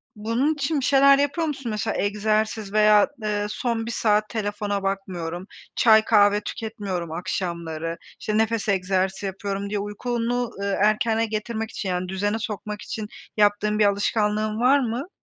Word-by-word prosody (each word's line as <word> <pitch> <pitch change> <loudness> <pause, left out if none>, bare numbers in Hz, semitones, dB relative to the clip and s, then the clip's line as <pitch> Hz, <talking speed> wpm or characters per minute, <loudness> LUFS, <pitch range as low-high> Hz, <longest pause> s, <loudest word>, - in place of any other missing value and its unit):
bunun 230 +8 0
için 295 0 -1
bir 260 - -2
şeyler 275 0 +6
yapıyor 290 +3 0
musun? 270 -6 -4
Mesela 210 -2 -2
egzersiz 215 0 0
veya, 210 -1 +5 0.2
eee, 205 -1 -1
son 230 +1 -2
1 230 - -4
saat 215 -2 +1
telefona 205 -2 -2
bakmıyorum, 185 -2 -4 0.3
çay 220 -2 +5
kahve 205 -1 +4
tüketmiyorum 200 -8 -5
akşamları, 165 -1 -3 0.2
işte, 215 0 -1
nefes 225 -1 0
egzersizi 190 0 0
yapıyorum 195 +1 -4
diye 205 0 -1
uykunu, 235 +3 -2
ııı, 200 -1 -1
erkene 220 +2 +2
getirmek 220 +1 -4
için, 195 - -4
yani, 180 0 -2
düzene 205 +3 -1
sokmak 210 -1 -5
için 215 -2 -5 0.3
yaptığın 210 0 +2
bir 210 - +5
alışkanlığın 210 +1 +1
var 265 +4 +5
mı? 250 +6 -3
210 Hz, 150 wpm, -24 LUFS, 200-225 Hz, 0.3 s, şeyler